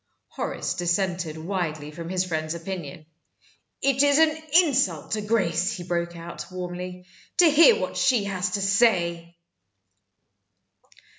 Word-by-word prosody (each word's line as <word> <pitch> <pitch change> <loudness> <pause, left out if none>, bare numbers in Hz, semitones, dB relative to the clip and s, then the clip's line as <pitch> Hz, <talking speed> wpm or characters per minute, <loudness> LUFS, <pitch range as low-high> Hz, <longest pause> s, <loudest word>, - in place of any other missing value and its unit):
Horace - - -3
dissented 175 -2 -1
widely 160 -4 -4
from 165 +2 -8
his 185 0 0
friend's 160 -2 -3
opinion. 165 -4 -7 0.8
"It's 275 0 +3
an 315 -1 +4 0.3
insult 250 - 0
to 215 - -1
Grace," 195 -4 0
he 175 - -7
broke 170 -1 -3
out, 170 0 -8
warmly, 180 0 -6 0.3
"to 360 - +6
hear 330 +10 +6
what - - -4
she 250 -6 +3
has 190 -1 -2
to 200 - -1
say!" 175 -5 +1
180 Hz, 125 wpm, -25 LUFS, 170-205 Hz, 0.8 s, to